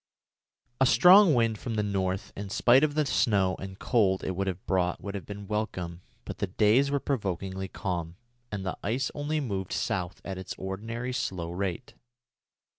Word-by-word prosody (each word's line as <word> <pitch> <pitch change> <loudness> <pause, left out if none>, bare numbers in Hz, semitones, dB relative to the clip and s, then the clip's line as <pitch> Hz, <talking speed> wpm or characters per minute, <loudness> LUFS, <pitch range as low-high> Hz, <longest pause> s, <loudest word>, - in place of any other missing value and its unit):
A 130 - +5
strong 180 - +7
wind 115 -3 +1
from 115 -3 -4
the 105 - +1
north, 95 -2 -2
in 100 0 -6
spite 120 +6 +5
of 150 -1 +1
the 155 -1 +2
snow 100 -9 +2
and 95 0 -7
cold 100 -6 +2
it - - -1
would 95 +2 -2
have 95 -1 -4
brought, 90 -1 0
would 100 - -6
have 100 - -6
been 100 0 -7
welcome; 90 -5 -3 0.2
but - - -7
the 100 - 0
days 110 +8 +3
were 140 0 +1
provokingly 95 -7 -3
calm, 85 -4 -4 0.4
and 100 -2 -4
the 95 - -2
ice 125 +5 -1
only 150 +1 -1
moved 100 -9 -3
south 90 -5 -2
at 95 -1 -5
its 95 - -6
ordinary 115 +6 -4
slow 85 -8 -3
rate. 95 +5 -4
100 Hz, 180 wpm, -28 LUFS, 95-120 Hz, 0.4 s, strong